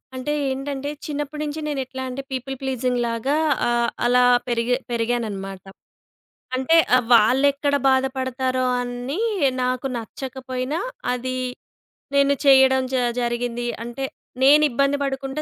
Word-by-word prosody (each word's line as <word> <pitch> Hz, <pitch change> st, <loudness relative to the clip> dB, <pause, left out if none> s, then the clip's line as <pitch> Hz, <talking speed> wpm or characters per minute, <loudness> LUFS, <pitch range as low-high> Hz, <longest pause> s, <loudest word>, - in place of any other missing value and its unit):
అంటే 295 Hz, +4 st, -2 dB, 0.2 s
ఏంటంటే, 275 Hz, +1 st, -3 dB, 0.2 s
చిన్నప్పటి 295 Hz, 0 st, -4 dB
నుంచి 300 Hz, +1 st, -4 dB
నేనెట్లా 265 Hz, -2 st, -4 dB, 0.3 s
పీపుల్ 265 Hz, +1 st, -4 dB
ప్లీజింగ్‌లాగా 250 Hz, +1 st, -1 dB, 0.3 s
ఆహ్, 235 Hz, 0 st, +2 dB, 0.2 s
అలా 250 Hz, +1 st, +4 dB, 0.2 s
పెరిగే 240 Hz, +1 st, +1 dB, 0.2 s
పెరిగాననమాట. 220 Hz, -5 st, -2 dB, 0.9 s
అంటే 265 Hz, +6 st, +3 dB, 0.2 s
ఆహ్, 245 Hz, -, -1 dB
వాళ్లెక్కడ 280 Hz, +5 st, +4 dB
బాధపడతారో 260 Hz, -1 st, 0 dB, 0.2 s
అని 245 Hz, -, -4 dB, 0.4 s
నాకు 255 Hz, +1 st, -1 dB
నచ్చకపోయినా 260 Hz, +4 st, -5 dB, 0.3 s
అది 255 Hz, +1 st, -3 dB, 0.8 s
నేను 280 Hz, 0 st, +4 dB
చేయడం 265 Hz, -1 st, +6 dB
జ -, -, +2 dB, 0.3 s
జరిగింది. 240 Hz, 0 st, -2 dB, 0.2 s
అంటే 240 Hz, +3 st, -6 dB, 0.4 s
నేనిబ్బంది 285 Hz, -1 st, +4 dB
పడుకుంటా 270 Hz, +2 st, -3 dB
260 Hz, 100 wpm, -22 LUFS, 245-275 Hz, 0.9 s, చేయడం